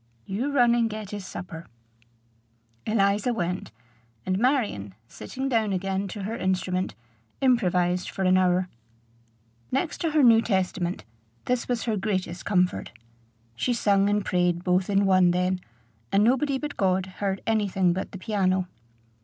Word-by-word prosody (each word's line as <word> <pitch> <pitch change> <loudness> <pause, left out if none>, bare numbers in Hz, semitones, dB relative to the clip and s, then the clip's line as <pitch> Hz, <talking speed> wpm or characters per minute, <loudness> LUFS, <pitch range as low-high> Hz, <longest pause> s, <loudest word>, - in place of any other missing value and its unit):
"You 235 +9 -2
run 245 -4 +4
and 235 -1 +2
get 215 -2 -6
his 205 -2 -6
supper." 165 -2 -8 1.2
Eliza 210 +2 +2
went; 180 - -3 0.5
and 185 +1 0
Marion, 215 - 0
sitting 265 - -5
down 225 -5 +1
again 195 +1 -1
to 200 +1 -6
her 220 +4 -3
instrument, 185 - -1 0.4
improvised 180 -8 +2
for 190 - -4
an 185 0 +4
hour. 185 0 +2 1.0
Next 275 +4 -1
to 330 - +1
her 305 -2 +3
New 230 -2 +7
Testament, 185 -4 -1 0.4
this 250 -1 0
was 245 -2 -1
her 220 -3 -1
greatest 185 -3 -2
comfort. 180 -3 +1 0.6
She 245 - 0
sung 200 -3 +3
and 205 -1 0
prayed 175 -1 +1
both 180 +1 +1
in 200 0 +3
one 185 -2 +5
then, 180 +1 0 0.5
and 200 +1 +4
nobody 265 +4 +2
but 295 +2 -6
God 190 -2 +1 0.2
heard 195 -1 -1
any 220 -2 +1
thing 185 -2 +2
but 190 - -4
the - - -7
piano. 185 -2 0
195 Hz, 150 wpm, -26 LUFS, 185-225 Hz, 1.2 s, New